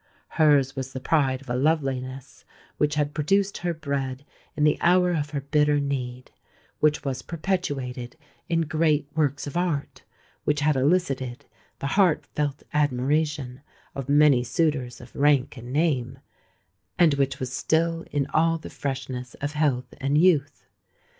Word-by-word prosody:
Hers 145 Hz, -4 st, +3 dB
was 135 Hz, -1 st, -5 dB
the 130 Hz, -, -4 dB
pride 135 Hz, -2 st, +1 dB
of 135 Hz, -, -14 dB
a -, -, 0 dB
loveliness 135 Hz, -2 st, -1 dB, 0.4 s
which 150 Hz, 0 st, +2 dB
had 150 Hz, -1 st, 0 dB
produced 195 Hz, +6 st, +1 dB
her 175 Hz, 0 st, -1 dB
bread 140 Hz, -4 st, -3 dB, 0.3 s
in 150 Hz, -, +1 dB
the 150 Hz, -1 st, +3 dB
hour 180 Hz, +1 st, +4 dB
of 150 Hz, -3 st, -1 dB
her 145 Hz, -1 st, -3 dB
bitter 150 Hz, +1 st, +2 dB
need,—which 140 Hz, +2 st, -3 dB
was 130 Hz, -2 st, -2 dB
perpetuated 145 Hz, -9 st, -3 dB, 0.3 s
in 165 Hz, -1 st, +2 dB
great 155 Hz, -2 st, +1 dB
works 145 Hz, -3 st, 0 dB
of 145 Hz, -, -7 dB
art,—which 150 Hz, -2 st, -3 dB
had 150 Hz, 0 st, +3 dB
elicited 135 Hz, -3 st, 0 dB, 0.3 s
the -, -, -6 dB
heart 175 Hz, +2 st, +2 dB
felt 145 Hz, -1 st, -3 dB
admiration 145 Hz, -1 st, 0 dB, 0.3 s
of 135 Hz, -1 st, -6 dB
many 145 Hz, -3 st, +5 dB
suitors 125 Hz, -1 st, -1 dB
of 120 Hz, -, -14 dB
rank 140 Hz, -1 st, +2 dB
and 120 Hz, 0 st, -9 dB
name,—and 130 Hz, -, -2 dB
which 135 Hz, -2 st, 0 dB
was 130 Hz, 0 st, -4 dB
still 165 Hz, +3 st, 0 dB
in 145 Hz, -2 st, 0 dB
all 165 Hz, +1 st, +3 dB
the 160 Hz, -, -10 dB
freshness 130 Hz, -3 st, -5 dB
of 145 Hz, +1 st, -4 dB
health 145 Hz, -4 st, 0 dB
and 140 Hz, +2 st, +1 dB
youth. 155 Hz, -4 st, +2 dB
145 Hz, 140 wpm, -25 LUFS, 130-155 Hz, 0.4 s, many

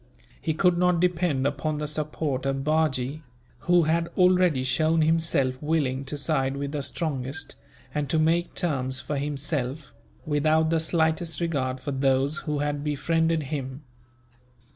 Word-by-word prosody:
He 160 Hz, -, -1 dB
could 175 Hz, +1 st, +3 dB
not 180 Hz, -1 st, +3 dB
depend 170 Hz, -6 st, +1 dB
upon 145 Hz, +2 st, -1 dB
the 150 Hz, 0 st, -3 dB
support 150 Hz, -2 st, -2 dB
of 135 Hz, 0 st, -1 dB
Bajee, 155 Hz, -2 st, 0 dB, 0.4 s
who 175 Hz, -1 st, +3 dB
had 165 Hz, +2 st, +1 dB
already 180 Hz, -6 st, +4 dB
shown 155 Hz, +5 st, +2 dB
himself 155 Hz, -5 st, +1 dB
willing 145 Hz, -4 st, 0 dB
to 145 Hz, +2 st, -4 dB
side 135 Hz, -1 st, 0 dB
with 140 Hz, 0 st, -3 dB
the 145 Hz, -1 st, -2 dB
strongest, 140 Hz, 0 st, -4 dB, 0.4 s
and 150 Hz, -2 st, -2 dB
to 160 Hz, -, +2 dB
make 165 Hz, +2 st, +1 dB
terms 130 Hz, -7 st, -1 dB
for 145 Hz, -, -3 dB
himself, 140 Hz, 0 st, -3 dB, 0.3 s
without 155 Hz, +1 st, +2 dB
the 165 Hz, -, +3 dB
slightest 160 Hz, -1 st, 0 dB
regard 135 Hz, -6 st, -1 dB
for 145 Hz, -, -4 dB
those 135 Hz, +2 st, +1 dB
who 150 Hz, -, 0 dB
had 145 Hz, -1 st, -2 dB
befriended 160 Hz, +2 st, +1 dB
him. 135 Hz, -1 st, -5 dB
150 Hz, 145 wpm, -26 LUFS, 135-160 Hz, 0.4 s, already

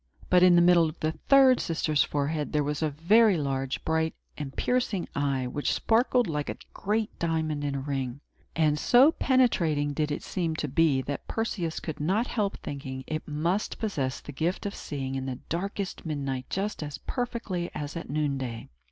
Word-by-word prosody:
But, 180 Hz, -1 st, +6 dB
in 180 Hz, -1 st, +7 dB
the 175 Hz, -, +6 dB
middle 175 Hz, -2 st, +5 dB
of 155 Hz, -, -11 dB
the 155 Hz, -, 0 dB
third 260 Hz, -, +5 dB
sister's 155 Hz, -2 st, +1 dB
forehead, 150 Hz, +1 st, -2 dB
there 150 Hz, -1 st, +2 dB
was 145 Hz, +1 st, -2 dB
a 155 Hz, -, +2 dB
very 195 Hz, +7 st, +4 dB
large, 135 Hz, -2 st, -2 dB
bright, 160 Hz, 0 st, 0 dB, 0.2 s
and 145 Hz, -3 st, -5 dB
piercing 245 Hz, -7 st, 0 dB
eye, 140 Hz, -2 st, 0 dB
which 145 Hz, +4 st, -1 dB
sparkled 245 Hz, +2 st, +2 dB
like 150 Hz, -5 st, -2 dB
a -, -, -4 dB, 0.2 s
great 215 Hz, +2 st, -1 dB
diamond 160 Hz, -3 st, -1 dB
in 140 Hz, -1 st, -1 dB
a -, -, -1 dB
ring; 135 Hz, -2 st, -3 dB, 0.4 s
and 150 Hz, -2 st, +2 dB
so 255 Hz, -, +6 dB
penetrating 170 Hz, -, +2 dB
did 150 Hz, +1 st, -1 dB
it 145 Hz, -, -3 dB
seem 165 Hz, -3 st, -2 dB
to 155 Hz, -, -2 dB
be, 140 Hz, -2 st, +2 dB
that 140 Hz, +1 st, -5 dB
Perseus 185 Hz, -7 st, -2 dB
could 160 Hz, -, -6 dB
not 190 Hz, +10 st, +1 dB
help 205 Hz, -5 st, -1 dB
thinking 130 Hz, -2 st, -6 dB
it 155 Hz, +1 st, -4 dB
must 165 Hz, +7 st, -1 dB
possess 140 Hz, -12 st, -2 dB
the -, -, -8 dB
gift 165 Hz, +8 st, -2 dB
of 200 Hz, -, -2 dB
seeing 135 Hz, -3 st, -5 dB
in 135 Hz, 0 st, -3 dB
the 130 Hz, -2 st, -3 dB
darkest 195 Hz, +3 st, -3 dB
midnight 135 Hz, -5 st, -3 dB
just 200 Hz, 0 st, -2 dB
as 145 Hz, -2 st, -5 dB
perfectly 230 Hz, -8 st, -3 dB
as 145 Hz, +2 st, -5 dB
at 165 Hz, -, -6 dB
noonday. 135 Hz, -5 st, -2 dB
155 Hz, 185 wpm, -28 LUFS, 145-190 Hz, 0.4 s, in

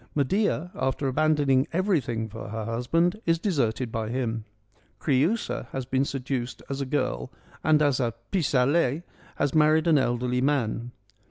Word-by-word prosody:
Medea 180 Hz, +3 st, +1 dB
after 135 Hz, +1 st, -1 dB
abandoning 145 Hz, -1 st, +2 dB
everything 155 Hz, -, 0 dB
for 110 Hz, 0 st, -8 dB
her 110 Hz, 0 st, -4 dB
husband 165 Hz, -, 0 dB
is 165 Hz, 0 st, +4 dB
deserted 130 Hz, -, 0 dB
by 110 Hz, -1 st, -2 dB
him. 115 Hz, -3 st, -2 dB, 0.5 s
Creiisa 145 Hz, -, 0 dB
has 130 Hz, -1 st, -3 dB
been 130 Hz, +2 st, +1 dB
seduced 130 Hz, -2 st, -4 dB
as 135 Hz, 0 st, -2 dB
a 135 Hz, -, -2 dB
girl 60 Hz, -, -1 dB, 0.3 s
and 155 Hz, -1 st, +4 dB
as 140 Hz, -3 st, +2 dB
a 115 Hz, -3 st, -1 dB
' -, -, -42 dB
pis 165 Hz, -7 st, 0 dB
aller 140 Hz, +3 st, +2 dB, 0.2 s
' -, -, -25 dB
has 145 Hz, -2 st, 0 dB
married 155 Hz, +1 st, +4 dB
an 160 Hz, -4 st, +5 dB
elderly 125 Hz, 0 st, 0 dB
man. 125 Hz, -4 st, 0 dB
135 Hz, 160 wpm, -26 LUFS, 120-155 Hz, 0.5 s, an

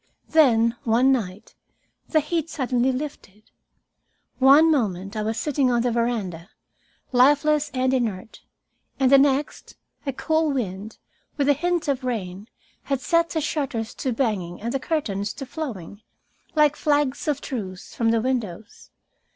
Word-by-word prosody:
Then, 235 Hz, -7 st, +4 dB
one 245 Hz, +4 st, +3 dB
night, 215 Hz, -4 st, -3 dB, 0.6 s
the 310 Hz, -, +3 dB
heat 330 Hz, +1 st, -2 dB
suddenly 255 Hz, -2 st, 0 dB
lifted. 255 Hz, -7 st, -7 dB, 0.9 s
One 285 Hz, +5 st, +7 dB
moment 200 Hz, -, -1 dB
I 215 Hz, -, -2 dB
was 220 Hz, +1 st, -2 dB
sitting 280 Hz, -3 st, +1 dB
on 240 Hz, -1 st, +1 dB
the 245 Hz, -, +1 dB
veranda, 215 Hz, -7 st, -2 dB, 0.6 s
lifeless 290 Hz, +3 st, +3 dB
and 260 Hz, -1 st, 0 dB
inert, 225 Hz, -5 st, -3 dB, 0.6 s
and 265 Hz, -1 st, +3 dB
the 275 Hz, -, +8 dB
next 280 Hz, +1 st, 0 dB, 0.3 s
a -, -, +1 dB
cool 315 Hz, +4 st, 0 dB
wind, 220 Hz, -5 st, -4 dB, 0.4 s
with 280 Hz, -2 st, +1 dB
a -, -, +7 dB
hint 345 Hz, +3 st, -1 dB
of 275 Hz, -2 st, -1 dB
rain, 205 Hz, -5 st, -4 dB, 0.4 s
had 275 Hz, -2 st, -1 dB
set 335 Hz, +4 st, +1 dB
the 320 Hz, -, -2 dB
shutters 270 Hz, -7 st, -3 dB
to 260 Hz, -, -3 dB
banging 210 Hz, -8 st, -2 dB
and 235 Hz, +3 st, -4 dB
the 270 Hz, -, 0 dB
curtains 205 Hz, -11 st, -2 dB
to 270 Hz, -, -7 dB
flowing, 225 Hz, -, -7 dB, 0.5 s
like 300 Hz, -1 st, +4 dB
flags 290 Hz, -2 st, 0 dB
of 290 Hz, -2 st, 0 dB
truce, 190 Hz, -11 st, -6 dB
from 230 Hz, -1 st, +1 dB
the 225 Hz, 0 st, +2 dB
windows. 225 Hz, -5 st, -4 dB
255 Hz, 145 wpm, -23 LUFS, 220-290 Hz, 0.9 s, the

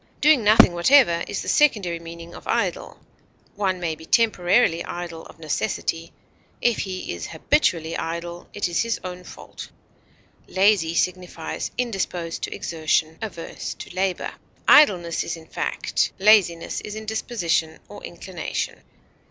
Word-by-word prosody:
Doing 295 Hz, -5 st, +5 dB
nothing 210 Hz, -4 st, +7 dB
whatever 175 Hz, -2 st, +5 dB
is -, -, -4 dB
the -, -, -9 dB
secondary 205 Hz, -, +2 dB
meaning 170 Hz, 0 st, -10 dB
of -, -, -11 dB
idle. -, -, -2 dB, 0.5 s
One 190 Hz, -3 st, 0 dB
may 170 Hz, -2 st, -2 dB
be 160 Hz, +1 st, -11 dB
temporarily 190 Hz, -5 st, +3 dB
idle 175 Hz, -2 st, -7 dB
of -, -, -16 dB
necessity; 165 Hz, +1 st, -2 dB, 0.5 s
if 240 Hz, -2 st, +1 dB
he 185 Hz, -, -4 dB
is 85 Hz, -2 st, -6 dB
habitually 165 Hz, -, 0 dB
idle, 170 Hz, +1 st, -5 dB
it 205 Hz, -, -2 dB
is 175 Hz, -, 0 dB
his 230 Hz, -1 st, -1 dB
own 180 Hz, -1 st, -7 dB
fault. -, -, -10 dB, 0.8 s
Lazy 190 Hz, -4 st, +3 dB
signifies 180 Hz, -2 st, -2 dB
indisposed 190 Hz, -8 st, -2 dB
to -, -, -4 dB
exertion, 160 Hz, 0 st, -1 dB
averse 200 Hz, -7 st, -6 dB
to -, -, -10 dB
labor; 190 Hz, -1 st, -1 dB, 0.4 s
idleness 175 Hz, -, +5 dB
is 170 Hz, -, -4 dB
in 160 Hz, -, -13 dB
fact; -, -, -1 dB
laziness 190 Hz, -5 st, +3 dB
is 210 Hz, -, -7 dB
in 220 Hz, 0 st, -7 dB
disposition 180 Hz, -8 st, -1 dB
or -, -, -11 dB
inclination. -, -, -5 dB
175 Hz, 135 wpm, -23 LUFS, 165-210 Hz, 0.8 s, nothing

